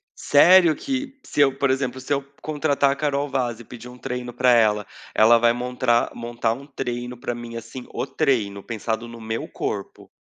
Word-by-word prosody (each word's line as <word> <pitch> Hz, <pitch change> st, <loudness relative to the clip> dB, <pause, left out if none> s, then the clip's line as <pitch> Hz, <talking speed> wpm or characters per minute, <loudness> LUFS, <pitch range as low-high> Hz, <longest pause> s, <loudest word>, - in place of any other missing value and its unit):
Sério 170 Hz, +1 st, +6 dB
que, 270 Hz, 0 st, -4 dB
se -, -, -6 dB
eu, 135 Hz, -1 st, +3 dB
por 140 Hz, -1 st, +1 dB
exemplo, 130 Hz, -1 st, -1 dB
se 145 Hz, +3 st, -2 dB
eu 140 Hz, -, 0 dB, 0.2 s
contratar 145 Hz, -2 st, +1 dB
a -, -, -1 dB
Carol 145 Hz, -1 st, -1 dB
Vaz 120 Hz, -4 st, -1 dB
e -, -, -10 dB
pedir 120 Hz, +1 st, -11 dB
um 125 Hz, -, -12 dB
treino 125 Hz, -1 st, -5 dB
para 125 Hz, 0 st, +3 dB
ela, 105 Hz, -3 st, +3 dB, 0.3 s
ela 115 Hz, +2 st, +6 dB
vai 120 Hz, 0 st, +4 dB
montar- 125 Hz, -1 st, 0 dB
montar 120 Hz, -1 st, -2 dB
um 140 Hz, +3 st, -9 dB
treino 125 Hz, -3 st, -5 dB
para 120 Hz, -, -3 dB
mim, 120 Hz, -1 st, -8 dB
assim, 125 Hz, +2 st, -8 dB
o -, -, -2 dB
treino, 105 Hz, -9 st, 0 dB
pensado 115 Hz, +1 st, -4 dB
no 115 Hz, 0 st, -10 dB
meu 110 Hz, +1 st, -4 dB
corpo? -, -, -5 dB
125 Hz, 195 wpm, -23 LUFS, 115-140 Hz, 0.3 s, Sério